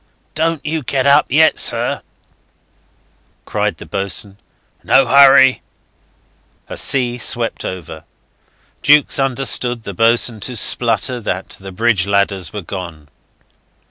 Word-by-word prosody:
"Don't 160 -1 -2
you 155 +1 -2
get 135 0 -2
up 140 +1 +4
yet, 160 +3 +3
sir," - - 0 1.4
cried - - -2
the - - -11
boatswain. 100 +1 -4 0.4
"No 135 0 +3
hurry!" 135 0 +5 1.1
A - - -8
sea 125 -2 +1
swept 120 0 -1
over. 80 -3 -8 0.8
Jukes 145 -1 +3
understood 125 -3 -1
the 100 - -7
boatswain 115 +2 +1
to 125 +4 -4
splutter 120 +3 0
that 95 -3 -4
the 95 0 -10
bridge 100 -1 0
ladders 100 -2 -1
were 105 -2 -7
gone. 85 -5 -8
120 Hz, 115 wpm, -16 LUFS, 100-135 Hz, 1.4 s, hurry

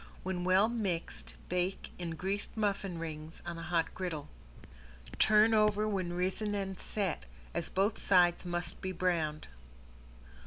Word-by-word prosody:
When 185 -1 -2
well 185 +3 +5
mixed 200 -8 -3
bake 180 +2 -1
in 170 -2 -3
greased 195 +5 -2
muffin 200 -4 0
rings 160 0 -6
on 170 -1 -4
a - - -6
hot 165 0 0
griddle. 170 -6 -4 0.9
Turn 215 +1 +6
over 210 0 +4
when 185 -4 -1
risen 190 +4 -1
and 195 -2 -3
set, 200 -5 -2 0.3
as 170 - -2
both 200 +3 +1
sides 175 -2 +4
must 175 -1 -2
be 185 - -2
browned. 165 -4 0
185 Hz, 140 wpm, -33 LUFS, 170-200 Hz, 0.9 s, Turn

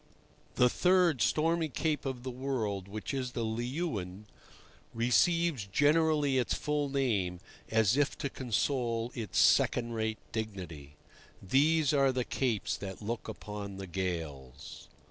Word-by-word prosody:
The 125 - +5
third 180 -2 +3
stormy 165 +1 +2
cape 150 +3 -1
of 125 -2 -4
the 130 - -4
world, 120 -7 -3
which 105 +6 -5
is 130 -2 -3
the 115 - -2
Leeuwin, 110 - -3 0.7
receives 125 - +2
generally 145 +2 +3
its 125 - 0
full 150 -1 -1
name, 105 -11 0 0.3
as 110 0 +3
if 145 0 +1
to 140 - -2
console 120 -1 -1
its 110 -6 -4
second 120 -1 +4
rate 110 -1 -2
dignity. 90 -10 -6 0.4
These 150 - +3
are 135 -2 +4
the 125 -1 -1
capes 120 -6 -1
that 95 +1 -7
look 115 +3 -4
upon 105 -2 -7
the 95 - -6
gales. 80 -7 -5
120 Hz, 130 wpm, -31 LUFS, 100-140 Hz, 0.7 s, The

